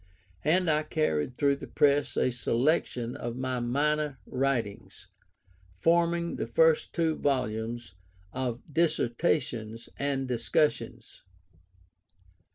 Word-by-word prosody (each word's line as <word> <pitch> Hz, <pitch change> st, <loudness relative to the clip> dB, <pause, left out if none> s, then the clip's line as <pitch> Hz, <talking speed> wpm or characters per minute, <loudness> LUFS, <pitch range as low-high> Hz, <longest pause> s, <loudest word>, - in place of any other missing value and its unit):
And 180 Hz, +4 st, +3 dB
I 155 Hz, -1 st, +3 dB
carried 130 Hz, -, -1 dB
through 140 Hz, -1 st, +2 dB
the -, -, -9 dB
press 145 Hz, 0 st, +2 dB
a 130 Hz, -, +2 dB
selection 125 Hz, 0 st, 0 dB
of 120 Hz, 0 st, -5 dB
my 130 Hz, 0 st, -2 dB
minor 145 Hz, +3 st, 0 dB
writings, 125 Hz, -6 st, -2 dB, 0.7 s
forming 170 Hz, -, +2 dB
the -, -, -3 dB
first 485 Hz, -1 st, +3 dB
two 165 Hz, -2 st, +1 dB
volumes 120 Hz, -6 st, -2 dB, 0.4 s
of 125 Hz, -2 st, -3 dB
Dissertations 120 Hz, -7 st, 0 dB
and 140 Hz, -1 st, -1 dB
Discussions. 125 Hz, +4 st, -1 dB
135 Hz, 100 wpm, -28 LUFS, 120-155 Hz, 0.7 s, And